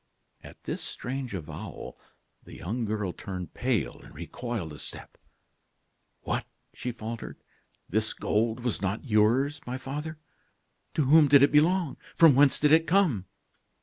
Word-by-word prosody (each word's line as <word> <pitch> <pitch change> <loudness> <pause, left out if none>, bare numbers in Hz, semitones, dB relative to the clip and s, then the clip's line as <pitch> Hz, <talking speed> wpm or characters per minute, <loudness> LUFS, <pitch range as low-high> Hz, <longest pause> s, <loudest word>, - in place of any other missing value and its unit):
At - - -14
this - - -4
strange 130 -3 -5
avowal 80 -5 -8 0.4
the - - -12
young 110 +7 -3
girl 105 -4 -2
turned 90 -2 -7
pale 120 -7 -1
and - - -15
recoiled 90 - -5
a 75 - -10
step. - - -7 1.1
"What?" - - -2 0.3
she 125 - -4
faltered; 115 0 -7 0.5
"this 110 +3 0
gold 110 +2 0
was 120 -5 -2
not 100 +5 -2
yours, 130 +6 +2
my 125 +1 -3
father? 150 +4 -5 0.8
To 155 - +3
whom 150 +2 +7
did 140 0 +7
it 140 - +5
belong? 165 +1 +3 0.2
From 165 -3 +7
whence 140 +1 +5
did 150 0 +3
it 160 +1 +5
come?" 165 - +2
125 Hz, 145 wpm, -28 LUFS, 105-145 Hz, 1.1 s, whom